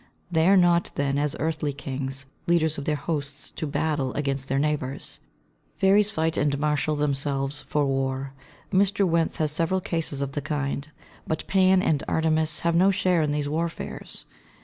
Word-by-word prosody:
They 160 0 +3
are 195 +1 +6
not, 175 -1 +4
then, 140 0 0
as 145 -1 0
earthly 155 -2 -1
kings, 135 0 -4 0.2
leaders 160 -3 +2
of 140 - -6
their 150 - +1
hosts 145 -1 -4
to 155 - -4
battle 145 -2 -1
against 135 -2 -2
their 135 - 0
neighbours. 140 -2 -2 0.6
Fairies 200 +2 +4
fight 160 -5 -1
and 145 -1 +1
marshal 150 +1 0
themselves 140 -1 0
for 150 -1 +1
war; 135 0 -1 0.4
Mr. 200 +1 +3
Wentz 165 -1 +1
has 155 -2 +1
several 165 +4 +1
cases 165 -6 -2
of 140 - -4
the 145 - -3
kind. 145 0 -3 0.4
But 160 - -2
Pan 190 -1 +4
and 150 -3 +1
Artemis 160 -1 +1
have 170 0 +1
no 185 +3 +5
share 185 -3 +2
in 150 -1 +1
these 145 -1 -1
warfares. 165 +3 -4
150 Hz, 170 wpm, -25 LUFS, 140-165 Hz, 0.6 s, are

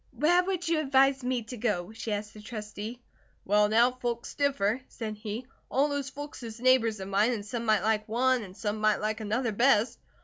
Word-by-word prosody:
"Where 345 +7 +4
would 365 -2 -2
you 330 -1 +2
advise 270 -2 +3
me 250 -1 -1
to 245 +3 -8
go?" 210 -5 -1
she 225 0 -5
asked 210 0 -3
the 215 - -11
Trustee. 215 +2 -7 0.4
"Well, 210 +1 +4
now, 235 +3 +5
folks 240 -2 -4
differ," 260 -5 +1
said 215 -2 -6
he. 215 +3 -5 0.2
"All 280 +3 +2
those 285 -1 -2
folks 290 +1 -8
is 230 -1 -8
neighbours 235 -4 +3
of 190 - -6
mine 205 +5 +2
and 205 -3 -4
some 235 +2 -4
might 215 -3 +3
like 215 0 0
one, 255 +2 +2
and 190 -3 -10
some 210 0 -3
might 215 -1 +3
like 215 +1 -2
another, 220 +3 -1
best. 230 0 +3
230 Hz, 205 wpm, -29 LUFS, 210-260 Hz, 0.4 s, now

